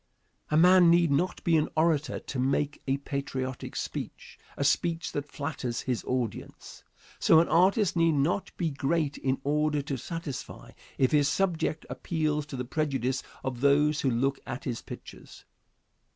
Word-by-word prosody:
A 155 Hz, -, +2 dB
man 180 Hz, +1 st, +7 dB
need 170 Hz, -2 st, +4 dB
not 175 Hz, +7 st, 0 dB
be 170 Hz, -2 st, +3 dB
an 155 Hz, -, +1 dB
orator 155 Hz, -2 st, +2 dB
to 135 Hz, -, -6 dB
make 140 Hz, +3 st, 0 dB
a 135 Hz, +1 st, +1 dB
patriotic 140 Hz, -2 st, -4 dB
speech, -, -, -6 dB, 0.2 s
a -, -, -1 dB
speech 165 Hz, +4 st, +1 dB
that 145 Hz, 0 st, -5 dB
flatters 140 Hz, -5 st, -3 dB
his 125 Hz, -4 st, -2 dB
audience. 125 Hz, -4 st, -4 dB, 0.4 s
So, 160 Hz, -, +6 dB
an 170 Hz, -, +3 dB
artist 190 Hz, +3 st, +3 dB
need 165 Hz, -1 st, +3 dB
not 150 Hz, +7 st, 0 dB
be 165 Hz, -3 st, -1 dB
great 145 Hz, +1 st, -1 dB
in 130 Hz, 0 st, 0 dB
order 150 Hz, 0 st, +1 dB
to 140 Hz, -1 st, -3 dB
satisfy, 160 Hz, 0 st, -7 dB, 0.3 s
if 130 Hz, -, +3 dB
his 145 Hz, -2 st, +4 dB
subject 170 Hz, -4 st, 0 dB
appeals 155 Hz, -3 st, -2 dB
to 140 Hz, -, -7 dB
the 125 Hz, -, -3 dB
prejudice 135 Hz, -2 st, -1 dB, 0.2 s
of 125 Hz, -2 st, -4 dB
those 145 Hz, +2 st, +3 dB
who 135 Hz, -, +2 dB
look 135 Hz, +3 st, 0 dB
at 120 Hz, -, -5 dB
his 120 Hz, -3 st, -3 dB
pictures. -, -, -11 dB
145 Hz, 160 wpm, -28 LUFS, 135-165 Hz, 0.4 s, man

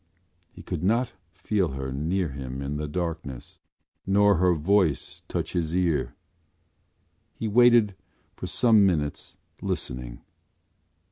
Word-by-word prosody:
He -, -, -13 dB
could -, -, -4 dB
not 115 Hz, +5 st, +1 dB, 0.2 s
feel 90 Hz, -2 st, -1 dB
her 65 Hz, -1 st, -4 dB
near 85 Hz, +5 st, -1 dB
him 65 Hz, -1 st, -6 dB
in 70 Hz, +2 st, -3 dB
the 75 Hz, 0 st, -3 dB
darkness 80 Hz, -5 st, -5 dB, 0.5 s
nor 100 Hz, 0 st, +4 dB
her 90 Hz, 0 st, +3 dB
voice 85 Hz, -1 st, +1 dB
touch -, -, -3 dB
his 85 Hz, -1 st, -1 dB
ear. 75 Hz, -9 st, 0 dB, 1.2 s
He 110 Hz, -, -3 dB
waited 120 Hz, -2 st, +5 dB, 0.4 s
for 90 Hz, -, -6 dB
some 110 Hz, +3 st, +4 dB
minutes 75 Hz, -7 st, -1 dB, 0.2 s
listening. 60 Hz, -1 st, -4 dB
85 Hz, 120 wpm, -26 LUFS, 70-100 Hz, 1.2 s, waited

